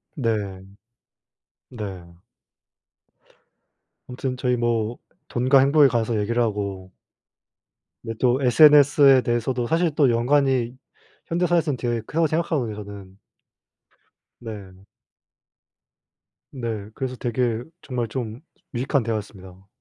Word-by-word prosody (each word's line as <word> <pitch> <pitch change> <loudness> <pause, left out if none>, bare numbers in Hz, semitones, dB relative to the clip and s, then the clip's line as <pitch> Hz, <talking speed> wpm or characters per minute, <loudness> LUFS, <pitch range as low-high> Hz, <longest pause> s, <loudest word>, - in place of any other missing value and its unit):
네. 105 - -2 1.1
네. 95 -8 -8 1.9
아무튼 130 +1 -4
저희 125 -1 0
뭐 115 -1 -1 0.3
돈과 130 +3 +3
행복에 140 +1 +5
관해서 115 -1 0
얘기를 115 +4 0
하고 100 -4 -3 1.1
네 115 - -5
또 125 +1 +2
SNS에 140 0 +6
대해서도 120 +1 -1
사실 165 +2 +1
또 140 -5 +4
연관이 125 0 +1 0.5
현대 175 +2 0
사회에선 160 -5 +1
되게 120 -2 -2
크다고 160 +8 0
생각하거든요 155 -8 -1
저는. 100 -2 -10 1.2
네. 100 -4 -10 1.7
네 115 -6 -5
그래서 130 -2 -4
되게 120 -1 -1 0.2
정말 120 -3 -3
좀 115 -1 -5 0.3
유익한 130 +2 0
대화였습니다. 95 -4 -6
120 Hz, 225 characters per minute, -23 LUFS, 105-135 Hz, 1.9 s, SNS에